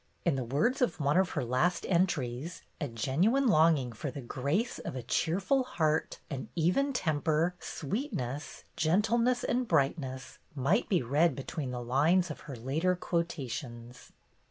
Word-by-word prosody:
In 170 -5 +3
the 130 - -1
words 150 - 0
of 250 - +1
one 145 +1 +2
of 185 0 +3
her 145 - +1
last 150 +9 +1
entries, 165 -4 0 0.2
a 145 - -1
genuine 155 - +1
longing 155 - +4
for 115 +6 -5
"the 135 - -7
grace 145 - -1
of - - -6
a 125 - -4
cheerful 195 - +1
heart, 160 -11 0
an 135 -3 -5
even 180 - +2
temper, 160 - +1
sweetness, 150 - -4
gentleness, 225 +9 +2
and 245 0 0
brightness," 135 -4 -1 0.2
might 150 - +1
be 180 -9 +2
read 150 +8 +2
between 135 0 -4
the 125 -1 -4
lines 155 +8 +3
of - - -7
her 135 - -5
later 150 +10 0
quotations. 130 -9 -4
155 Hz, 150 wpm, -30 LUFS, 130-185 Hz, 0.2 s, longing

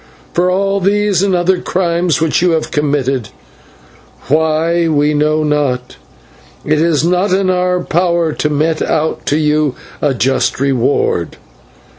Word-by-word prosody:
For 180 +1 +1
all 195 +2 0
these 200 -1 +1
and 195 -2 +1
other 180 +1 +1
crimes 175 -2 0
which 160 0 +1
you 180 -1 +2
have 160 -1 -2
committed 135 -6 -1 1.0
why 160 +3 +1
we 150 -1 +1
know 155 +1 +1
not 140 -4 -1 0.7
it 155 0 +1
is 160 -3 +1
not 180 +3 +1
in 190 0 +2
our 180 0 0
power 170 -2 0
to 150 - -1
mete 155 +2 0
out 160 0 -1
to 145 - +1
you 150 -2 +1 0.3
a 145 -3 +1
just 125 +1 0
reward. 130 -9 0
160 Hz, 140 wpm, -14 LUFS, 150-180 Hz, 1.0 s, you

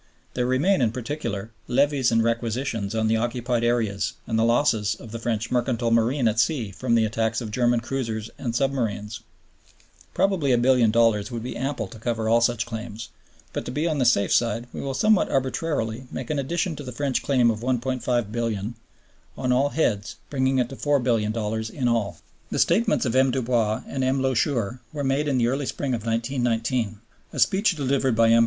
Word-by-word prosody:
There 125 -1 0
remain, 140 +8 +2
in 115 -3 +2
particular, 115 -4 -4 0.2
levies 135 0 +2
and 115 0 +3
requisitions 115 -2 -1
on 110 0 +1
the 110 +1 +2
occupied 120 +1 -1
areas 110 -4 0
and 110 -1 0
the - - +3
losses 115 -3 +2
of 115 - -12
the 115 - -5
French 115 -1 -2
mercantile 120 -1 0
marine 115 +3 +2
at 110 +1 +1
sea 115 -6 +1
from 115 +3 0
the 115 -1 +4
attacks 110 +1 0
of 110 -3 -6
German 120 +1 +2
cruisers 115 -3 -3
and 120 -3 -3
submarines. 115 -6 -1 1.0
Probably 190 -8 +2
$1,000,000,000 115 -3 +3
would 115 -3 -5
be 125 - -5
ample 135 +2 -2
to 115 - -11
cover 115 -1 -2
all 115 +1 +4
such 120 -1 +1
claims; 115 -1 -6 0.4
but - - -3
to - - -5
be 150 +5 -1
on 155 -3 0
the 130 - +2
safe 100 -5 +3
side, 115 0 +1
we - - -5
will, 135 -1 -3
somewhat 215 +5 +3
arbitrarily, 130 -3 -1
make 130 - -5
an 150 - 0
addition 165 +4 -1
to 145 - -6
the 125 - -6
French 140 -2 -1
claim 125 -4 +3
of 110 - -4
$1,500,000,000 120 -3 -1 0.6
on 125 - 0
all 135 +3 +3
heads, 115 -9 0 0.2
bringing 130 -1 +1
it 125 -2 +1
to 135 - -7
$4,000,000,000 110 -6 0
in 130 -1 -2
all. 105 -8 0 0.3
The - - -3
statements 210 - +2
of 120 0 -1
M. 130 0 +5
Dubois 120 -4 0
and 135 -1 -3
M. 130 +1 +1
Loucheur 125 -3 0
were 145 -2 -3
made 135 +2 +1
in 140 -3 +1
the 120 - +3
early 135 +2 -1
spring 135 -3 -2
of 115 -3 -2
1919. 115 -2 -1 0.3
A - - -7
speech 190 - +3
delivered 135 -3 +1
by 115 0 +4
M. 115 - +6
120 Hz, 190 wpm, -24 LUFS, 115-135 Hz, 1.0 s, M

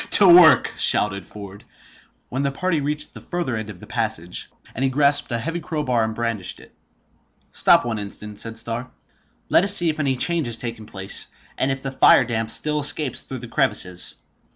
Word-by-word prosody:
to 200 - +7
work!" 175 -3 +7
shouted 100 -1 0
Ford, 100 -1 -11 0.6
when 130 +3 -3
the 140 -1 -1
party 165 +2 -1
reached 150 +1 -2
the - - -11
further 175 -9 -3
end 110 -1 -5
of 95 -4 -10
the - - -12
passage; 85 +2 -3 0.2
and 130 - -3
he 135 - +2
grasped 140 +1 +2
a 120 - 0
heavy 165 +8 -4
crowbar 150 -7 -1
and 110 0 -3
brandished 115 -6 -4
it. - - -18 0.8
"Stop - - +3
one 115 -3 -3
instant," 105 +1 -7
said 115 0 -4
Starr. 115 +2 -4 0.6
"Let - - +4
us 200 +1 +4
see 170 -2 +4
if 155 - -10
any 135 -3 0
change 165 +1 0
has 115 -1 +2
taken 115 -3 -7
place, 95 -1 -2 0.3
and 135 - 0
if 135 0 -5
the 135 - -3
fire 135 -1 +5
damp 115 -1 -3
still 150 +5 0
escapes 145 -1 +1
through 130 -2 -8
the - - -10
crevices." 90 -5 0
125 Hz, 195 wpm, -21 LUFS, 110-150 Hz, 0.8 s, to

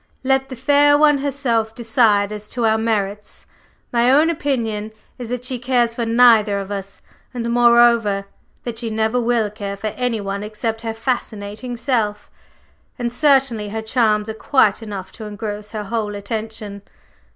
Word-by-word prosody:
Let 270 0 +1
the 260 - -6
fair 285 +3 +4
one 295 -1 +4
herself 245 -6 -1
decide 220 -3 +2
as 210 0 -7
to 240 -2 -1
our 220 0 +3
merits. 210 -2 -3 0.5
My 240 +1 +3
own 300 +5 +4
opinion 225 -8 -2 0.3
is 240 -2 -6
that 250 0 -3
she 255 -1 -3
cares 245 -1 +1
for 235 -1 -3
neither 225 -3 +5
of 200 0 -5
us, 195 -1 -7 0.3
and, 235 -1 -3
moreover, 235 -4 +4 0.4
that 235 -2 -4
she 235 -2 -2
never 220 +3 0
will 230 -3 +1
care 200 -2 -6
for 215 +2 -3
any 245 -2 -1
one 200 0 -4
except 220 +1 -4
her 225 -1 -4
fascinating 225 -1 -4
self. 225 -4 -1 0.7
And 240 -2 -3
certainly 265 -6 +2
her 220 +1 -4
charms 220 -2 +1
are 220 - -3
quite 220 -2 +2
enough 200 -4 -7
to 220 - -9
engross 210 0 -6
her 215 -1 -5
whole 210 -1 -3
attention. 210 0 -6
225 Hz, 160 wpm, -20 LUFS, 210-245 Hz, 0.7 s, neither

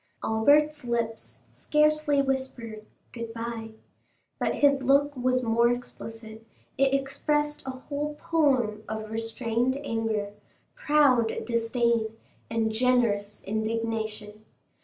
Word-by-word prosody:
Albert's 295 +7 +3
lips 235 -2 -3
scarcely 300 -1 +2
whispered 245 -5 -4 0.2
"Good 230 -1 -6
bye," 230 -1 -5 0.7
but - - 0
his 280 -1 +4
look 280 +2 +3
was 255 0 +1
more 235 +1 +3
explicit; 225 -2 -7 0.3
it 275 0 +3
expressed 295 +2 0
a 260 0 -6
whole 295 +1 -3
poem 265 -10 +1
of 220 0 -5
restrained 230 +3 -1
anger, 225 -5 -2 0.4
proud 290 - +3
disdain, 230 -1 0 0.3
and 225 -1 0
generous 220 -4 +1
indignation. 220 0 -3
235 Hz, 100 wpm, -27 LUFS, 225-275 Hz, 0.7 s, his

